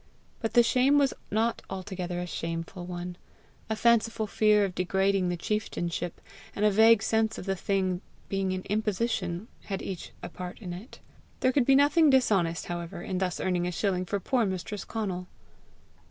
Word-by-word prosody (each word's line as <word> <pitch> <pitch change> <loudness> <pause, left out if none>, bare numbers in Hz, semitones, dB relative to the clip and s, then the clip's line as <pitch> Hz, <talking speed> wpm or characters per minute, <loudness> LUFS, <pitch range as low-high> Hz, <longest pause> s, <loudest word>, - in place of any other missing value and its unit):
But 225 - -2
the 240 - +8
shame 260 +4 +4
was 280 -2 +3 0.2
not 225 +2 0
altogether 185 -2 -4
a 180 - -2
shameful 165 +1 -5
one; 175 0 -5 0.5
a 220 - 0
fanciful 225 -1 +3
fear 210 0 +3
of 190 - -4
degrading 190 +1 +1
the 175 - -1
chieftainship, 175 -3 -2 0.4
and 210 - +1
a 210 - +5
vague 220 +1 +6
sense 220 0 +1
of - - -7
the 195 -1 0
thing 185 -1 0 0.3
being 195 -1 -1
an 185 0 -3
imposition, 210 -3 -1 0.2
had 195 -2 -4
each 185 -3 -6
a - - -5
part 180 -1 -7
in 180 -6 -6
it. 200 +9 -10 0.4
There 255 - +4
could 260 -2 +2
be 270 - +6
nothing 290 +3 +5
dishonest, 195 -11 +2
however, 170 0 -5
in 185 -1 -2
thus 185 -2 -1
earning 180 -1 0
a - - -1
shilling 185 0 0
for 200 +3 -1
poor 245 +5 +1
mistress 195 +1 -3
Conal! 190 -5 -3
195 Hz, 175 wpm, -28 LUFS, 180-220 Hz, 0.5 s, the